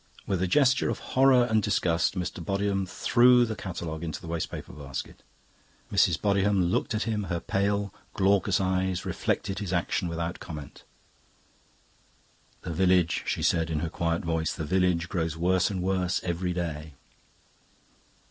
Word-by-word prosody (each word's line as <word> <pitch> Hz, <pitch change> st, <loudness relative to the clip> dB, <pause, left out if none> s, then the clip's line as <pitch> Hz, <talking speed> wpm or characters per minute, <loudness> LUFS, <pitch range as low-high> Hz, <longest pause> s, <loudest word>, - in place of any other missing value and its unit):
With 95 Hz, -3 st, -1 dB
a 95 Hz, -, +1 dB
gesture 130 Hz, +6 st, +3 dB
of -, -, -2 dB, 0.2 s
horror 130 Hz, -2 st, +5 dB
and 110 Hz, -2 st, +2 dB
disgust 90 Hz, -4 st, +1 dB
Mr. 90 Hz, -1 st, -4 dB
Bodiham 100 Hz, +1 st, -1 dB
threw 125 Hz, +2 st, +4 dB
the 110 Hz, -1 st, -4 dB
catalogue 85 Hz, -5 st, -5 dB
into 80 Hz, -3 st, -4 dB
the -, -, -12 dB
waste 85 Hz, -1 st, -2 dB
paper -, -, -8 dB
basket. 70 Hz, -2 st, -7 dB, 0.7 s
Mrs. 85 Hz, -, +3 dB
Bodiham 100 Hz, -3 st, +2 dB
looked 110 Hz, -, 0 dB
at 105 Hz, -, 0 dB
him; 110 Hz, -3 st, -2 dB
her 85 Hz, -2 st, -2 dB
pale, 100 Hz, +2 st, -1 dB, 0.2 s
glaucous 95 Hz, -1 st, +2 dB
eyes 95 Hz, -1 st, 0 dB
reflected 95 Hz, -1 st, -2 dB
his 100 Hz, -4 st, -4 dB
action 90 Hz, +2 st, 0 dB
without 85 Hz, +1 st, -3 dB
comment. 75 Hz, -4 st, -9 dB, 1.8 s
"The 85 Hz, -, -4 dB
village," 90 Hz, -1 st, +2 dB
she -, -, -1 dB
said 85 Hz, -1 st, +2 dB
in 75 Hz, -2 st, -1 dB
her 85 Hz, -, -2 dB
quiet 85 Hz, 0 st, -2 dB
voice, 80 Hz, -1 st, 0 dB
"the 80 Hz, -, -4 dB
village 90 Hz, 0 st, +1 dB
grows 80 Hz, -4 st, -2 dB
worse 90 Hz, +2 st, +2 dB
and 95 Hz, -3 st, -3 dB
worse 95 Hz, -1 st, 0 dB
every 90 Hz, +1 st, -2 dB
day." 80 Hz, -4 st, -4 dB
90 Hz, 155 wpm, -27 LUFS, 85-100 Hz, 1.8 s, horror